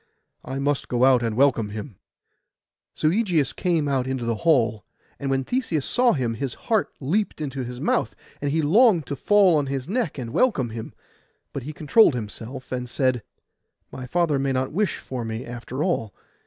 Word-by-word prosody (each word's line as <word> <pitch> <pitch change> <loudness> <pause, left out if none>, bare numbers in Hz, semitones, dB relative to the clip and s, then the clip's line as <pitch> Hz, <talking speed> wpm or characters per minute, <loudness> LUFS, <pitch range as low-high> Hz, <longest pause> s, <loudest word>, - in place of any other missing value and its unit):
I 130 +2 -5
must 140 0 -1
go 125 +1 +2
out 130 -2 +5
and 115 -2 -2
welcome 125 -6 +3
him.' 105 0 -8 1.0
So 155 - +2
Ægeus 175 - +1
came 170 -5 0
out 130 -2 0
into 130 -2 -2
the 115 -1 -1
hall; 120 -10 +2 0.4
and 140 - -3
when 135 0 +1
Theseus 195 - -1
saw 245 -1 +3
him, 125 -6 -1
his 125 +2 -4
heart 220 -3 0
leapt 185 +10 -1
into 140 -3 -3
his 125 0 -7
mouth, - - 0 0.3
and 145 - -1
he 160 +2 +1
longed 185 - +4
to 140 - -4
fall 195 +3 +4
on 145 -2 +1
his 135 0 -3
neck 205 - -1
and 120 -3 -5
welcome 140 - +2
him; 110 0 -7 0.6
but 140 - -4
he 140 +5 -6
controlled 155 - +4
himself, 120 +3 -7
and 125 -1 -3
said, 130 -2 +1 0.7
'My 130 -1 -7
father 165 -1 +1
may 135 0 0
not 130 0 -1
wish 200 +4 0
for 125 -2 -6
me, 110 +1 -5
after 120 +4 -5
all. 115 - -1
135 Hz, 185 wpm, -24 LUFS, 125-160 Hz, 1.0 s, out